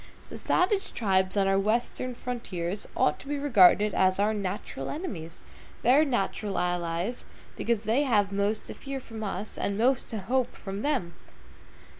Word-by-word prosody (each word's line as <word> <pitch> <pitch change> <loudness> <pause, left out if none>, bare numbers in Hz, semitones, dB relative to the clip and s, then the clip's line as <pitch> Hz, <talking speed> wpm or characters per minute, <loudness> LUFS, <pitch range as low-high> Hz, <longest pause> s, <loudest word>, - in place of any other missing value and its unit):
The - - -6
savage 385 +2 +1
tribes 190 -2 +1
on 195 -1 +3
our 195 0 +3
Western 240 +4 -1
frontier 190 -9 -4 0.2
ought 150 - +2
to - - -13
be 290 0 -1
regarded 210 -7 +5
as 185 0 +3
our 210 +2 +2
natural 195 -8 -4
enemies, 185 - -6 0.4
their 260 +6 +6
natural 210 -6 -1
allies, 175 +5 -1 0.3
because 230 -2 -1
they 225 +6 +2
have 210 -8 +2
most 200 +2 0
to - - -7
fear 275 -1 -6
from 225 -3 -8
us, 200 +1 -4
and 200 - -1
most 250 +3 +2
to 225 - -3
hope 250 +4 0
from 195 0 -6
them. 260 -13 -1
210 Hz, 160 wpm, -28 LUFS, 190-250 Hz, 0.4 s, their